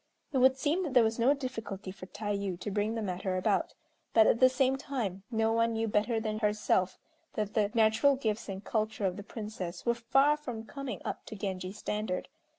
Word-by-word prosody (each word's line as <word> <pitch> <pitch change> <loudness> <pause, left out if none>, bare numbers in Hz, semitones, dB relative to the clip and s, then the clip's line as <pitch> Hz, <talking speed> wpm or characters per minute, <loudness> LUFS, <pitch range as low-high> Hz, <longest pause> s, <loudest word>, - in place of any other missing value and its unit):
It 265 - +3
would 260 +1 +5
seem 300 +7 +1
that 300 -8 -3
there 245 - +8
was 225 +1 0
no 260 +5 +4
difficulty 225 -8 -5
for 185 -1 -10
Tayû 200 -3 -3
to 205 - -3
bring 210 +3 0
the 225 - -2
matter 185 -1 -2
about, 185 - 0 0.4
but 220 -1 +8
at 230 - +4
the 255 - +7
same 260 0 +2
time 240 -9 -3
no 225 -1 +1
one 230 0 +2
knew 225 0 0
better 220 +2 +1
than 215 -1 -2
herself 210 -3 +1 0.4
that 210 -1 -2
the 210 -2 +2
natural 225 +5 +4
gifts 220 -5 -2
and 195 +1 -5
culture 215 -2 -1
of 185 -2 0
the 205 - -6
Princess 200 -4 -6
were 235 - +3
far 270 +5 +3
from 245 -7 -6
coming 275 +1 -6
up - - -4
to - - -7
Genji's 190 -1 -4
standard. 210 -4 -3
220 Hz, 205 wpm, -31 LUFS, 200-245 Hz, 0.4 s, there